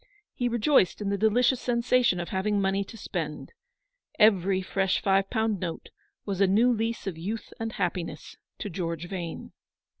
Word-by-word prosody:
He 245 -1 -1
rejoiced 235 - +3
in 205 -2 -2
the 200 - +1
delicious 240 +4 +3
sensation 240 -4 +2
of 170 - -4
having 200 +2 0
money 195 0 +1
to 225 - -11
spend. 160 - -5 0.6
Every 195 -3 +4
fresh 190 0 0
five 195 0 +2
pound 220 -3 0
note 170 -2 -5 0.4
was 200 -2 -2
a 195 - +6
new 230 +6 +4
lease 225 +1 -2
of 180 -5 -4
youth 215 +7 -5
and 225 0 -3
happiness 170 -4 -3 0.2
to 205 - -5
George 170 -1 -3
Vane. 175 -3 -6
195 Hz, 160 wpm, -27 LUFS, 180-225 Hz, 0.6 s, a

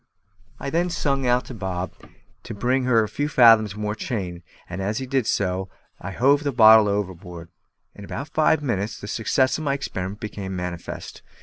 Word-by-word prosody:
I 140 - -4
then 175 +2 +1
sung 140 -5 -1
out 125 +1 +2
to - - -9
Bob 95 -4 -4 0.5
to - - -6
give 100 - -16 0.2
her 115 -3 +4
a - - -2
few 145 +8 -3
fathoms 115 -6 +5
more 105 0 -3
chain, 95 -6 -4 0.3
and 90 +2 -6
as 105 +3 -2
he 130 - -3
did 130 -3 -1
so 95 -1 -1 0.3
I 100 - -6
hove 140 +9 +2
the 140 - 0
bottle 110 -3 +7
overboard. 90 -4 -4 0.4
In 100 - -12
about 140 +8 -6
five 155 0 +2
minutes 110 -4 -2
the 100 - -8
success 130 +6 +1
of - - -5
my 140 -2 0
experiment 95 -7 -5
became 100 -3 -6
manifest. 90 -2 -6
110 Hz, 185 wpm, -23 LUFS, 95-135 Hz, 0.5 s, bottle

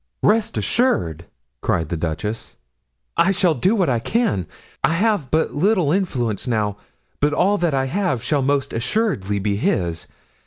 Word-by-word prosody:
"Rest 215 0 +2
assured," 85 - 0 0.4
cried 80 -4 0
the - - -1
duchess, 85 +7 -4 0.6
"I 170 - +4
shall 185 -3 +3
do 185 - +2
what 190 -5 +2
I 120 -3 +1
can. 205 - 0 0.4
I - - +3
have 200 - +1
but 160 +3 +1
little 180 -1 +2
influence 130 - -1
now, 105 -4 0 0.4
but 145 +1 +2
all 200 +4 +2
that 170 -5 +1
I 135 0 +1
have 135 - -1
shall 145 +2 +1
most 140 0 0
assuredly 115 - 0
be 100 0 -1
his. 85 -5 -1
140 Hz, 155 wpm, -21 LUFS, -, 0.6 s, I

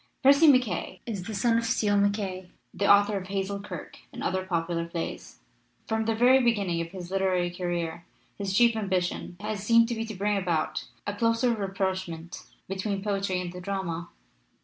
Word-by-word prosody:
Percy 280 +4 +7
MacKaye 245 - +2
is 200 -6 -4
the 220 - -4
son 230 +3 +3
of - - -3
Steele 210 -2 +1
MacKaye, 200 -2 0 0.2
the 200 - +3
author 205 0 +5
of 185 -1 -6
Hazel 195 +1 -2
Kirke 205 - -8
and - - -7
other 185 0 0
popular 170 -2 -1
plays. 170 -1 -6 0.5
From 220 0 0
the 225 0 +1
very 255 +3 +5
beginning 200 -8 +1
of 165 - -3
his 180 -1 -8
literary 185 -2 +1
career 175 -1 -3 0.3
his 200 -1 -3
chief 235 +3 +4
ambition 185 -4 -2
has 210 -1 -3
seemed 230 +1 +5
to - - 0
be 225 -1 -2
to 220 -2 -7
bring 205 +2 0
about 170 -4 -1 0.2
a 205 - -2
closer 230 +3 +2
rapprochement 190 -5 -3 0.3
between 195 +1 -3
poetry 195 -3 0
and 175 -1 -5
the 180 - -7
drama. 180 -3 -3
195 Hz, 175 wpm, -27 LUFS, 180-220 Hz, 0.5 s, Percy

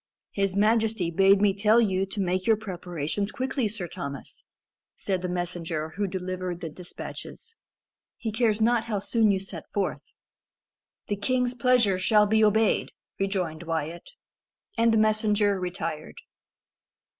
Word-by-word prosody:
"His 195 -1 0
majesty 215 -3 +2
bade 195 +3 +5
me 200 -2 +4
tell 210 +3 +4
you 195 -4 +1
to 195 - -6
make 185 +1 0
your 220 -1 +5
preparations 180 -2 -3
quickly, 260 -1 -1
Sir 205 -4 -4
Thomas," 140 -3 -7 0.5
said 190 -2 -2
the 180 - -3
messenger 175 -3 -3
who 200 +5 -2
delivered 185 -1 -4
the 165 - -5
despatches; 180 - -9 0.6
"he 225 - -3
cares 220 -1 +1
not 230 +1 +2
how 220 -3 -2
soon 220 +2 +2
you 195 -1 +2
set 195 - -9
forth." 200 - -1 1.0
"The 205 - -2
king's 250 +4 0
pleasure 235 -6 +3
shall 210 +2 +4
be 220 +1 +3
obeyed," 215 +1 +3 0.3
rejoined 185 -5 -1
Wyat. 165 0 -4 0.7
And 230 0 +3
the 225 - +3
messenger 215 -2 +2
retired. 165 -4 -4
200 Hz, 140 wpm, -26 LUFS, 180-220 Hz, 1.0 s, bade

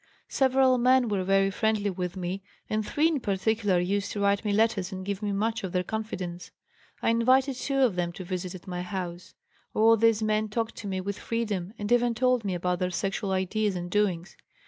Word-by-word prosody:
Several 260 -1 +3
men 255 -1 +4
were 200 -3 0
very 195 +1 +3
friendly 215 -1 0
with 180 0 -4
me 185 +2 -3 0.3
and 215 0 -1
three 295 +8 +2
in 320 -4 0
particular 205 -2 +1
used 195 +3 -1
to 205 - -4
write 200 +1 +2
me 210 - 0
letters 210 -2 +1
and 190 0 -6
give 200 0 -3
me 205 -1 -1
much 220 +3 -1
of 190 -1 -4
their 180 0 +1
confidence. 180 -4 -5 0.5
I - - +3
invited 255 +4 +3
two 275 +2 -1
of 240 -8 +3
them 175 -1 -1
to 185 - -7
visit 185 0 -4
at 180 - -11
my 180 -1 -4
house. 180 -1 -6 0.4
All 225 +1 +6
these 225 0 +3
men 215 0 +1
talked 225 +1 -2
to 210 - -6
me 190 -1 -2
with 200 +1 -4
freedom 210 -5 -3
and 205 +2 -4
even 240 -1 +3
told 250 -1 +2
me 195 -3 -1
about 180 0 -1
their 180 -1 0
sexual 195 +2 -2
ideas 190 +2 0
and 175 0 -5
doings. 195 -4 0
205 Hz, 210 wpm, -27 LUFS, 185-225 Hz, 0.5 s, All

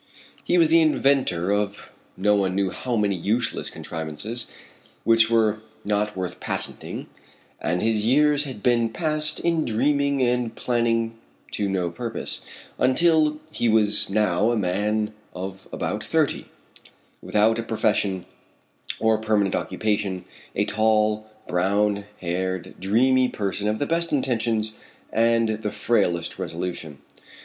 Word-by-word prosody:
He 180 - +2
was 165 -2 +5
the 165 +1 +6
inventor 135 - +2
of 105 0 -2 0.3
no 105 +2 +3
one 95 -2 +1
knew 100 -1 +1
how 125 +4 -3
many 105 -3 +1
useless 105 +7 -1
contrivances, 80 +9 -5 0.5
which 115 -1 +4
were 110 -2 +2 0.3
not 105 0 0
worth 90 -1 -4
patenting, - - -4 0.6
and 90 +2 0
his 110 -1 +1
years 145 +4 +3
had 130 -7 -8
been 120 -2 +3
passed 155 +2 -1
in 170 -2 +1
dreaming 140 +4 +1
and 120 -2 0
planning 115 -2 0 0.3
to 100 -1 -1
no 90 -3 -1
purpose; 115 +5 -4 0.4
until 155 +3 +4
he 120 - 0
was 105 -2 +4
now 105 0 +2
a 120 - +1
man 105 +3 0 0.2
of 95 +1 -7
about - - -3
thirty, - - 0 0.7
without 110 +2 +2
a - - +1
profession 105 -4 0 0.7
or 110 0 +3
a - - -9
permanent 105 -3 +1
occupation, 100 -4 -1 0.3
a - - +1
tall, 110 0 +1 0.2
brown 100 +3 +1 0.2
haired, 95 +1 -2
dreamy 125 +6 +3
person 100 0 -2
of 105 - 0
the 145 - -1
best 170 +2 0
intentions 115 -5 0 0.4
and 115 -1 +2
the 105 - -1
frailest 85 -8 0
resolution. 85 -3 -4
110 Hz, 130 wpm, -24 LUFS, 100-120 Hz, 0.7 s, the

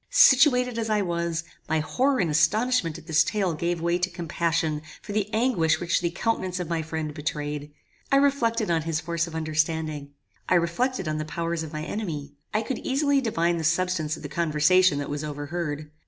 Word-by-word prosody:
Situated 250 -3 +5
as 225 -1 -2
I 210 -1 +2
was, 170 -2 -2 0.3
my 160 0 +2
horror 260 - +1
and 170 -4 +1
astonishment 210 +1 +2
at 165 - -13
this 160 -2 +4
tale 200 -6 0
gave 170 +2 -1
way 170 +1 0
to 180 +1 0
compassion 165 -2 -1 0.2
for 210 - -9
the 210 0 -1
anguish 215 -9 +2
which 175 0 0
the 170 - 0
countenance 185 -1 -1
of 180 - -3
my 165 -1 -1
friend 160 -1 -4
betrayed. 150 -1 -4 0.4
I - - +5
reflected 235 -7 +2
on 165 -1 +2
his 160 0 -1
force 170 +1 -2
of 165 - -8
understanding. 155 -2 -2 0.3
I - - +4
reflected 185 +5 0
on 155 0 -1
the 155 - -3
powers 165 +1 -2
of 160 -2 -6
my 155 -1 -4
enemy. 155 -7 -4 0.2
I 215 +1 0
could 260 - -3
easily 280 +1 +1
divine 170 -8 +1
the - - -3
substance 165 -1 0
of - - -12
the - - -4
conversation 165 +1 +3
that 145 - -3
was 145 +1 -3
overheard. 150 0 -4
170 Hz, 195 wpm, -26 LUFS, 155-210 Hz, 0.4 s, Situated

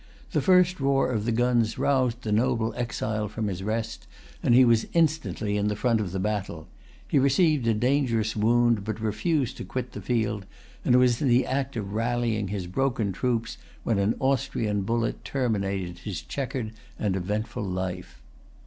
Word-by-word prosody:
The - - +1
first 180 -2 +4
roar 135 -1 +2
of 110 -3 -1
the 120 - +1
guns 120 -1 +2
roused 125 -3 +1
the 110 - -2
noble 115 +1 +1
exile 110 -3 -2
from 105 +2 -4
his 95 -1 -4
rest, 110 +2 -3 0.3
and 120 - +4
he 130 0 +7
was 115 -2 +3
instantly 155 -10 +1
in 105 0 +1
the 105 - 0
front 115 0 +1
of 95 -4 -3
the 95 - -3
battle. 95 -5 -3 0.4
He 140 - +3
received 140 -1 +3
a 115 - +3
dangerous 115 -2 +1
wound, 115 0 +3
but 110 +1 -4
refused 125 - -1
to - - -5
quit 125 -1 -4
the - - -7
field, 105 -5 -1 0.4
and 125 - +4
was 125 -2 +3
in 145 - +2
the 125 +1 +4
act 135 0 -2
of 100 -3 -4
rallying 115 -2 0
his 95 -2 -3
broken 115 +2 0
troops 115 +4 -2 0.2
when 110 -4 +1
an 100 +3 +2
Austrian 130 -6 0
bullet 115 +3 -1
terminated 100 -8 -2
his 100 0 -5
checkered 130 -5 -4 0.3
and 100 -3 0
eventful 105 +5 -3
life. 90 -1 -4
115 Hz, 175 wpm, -26 LUFS, 105-125 Hz, 0.4 s, he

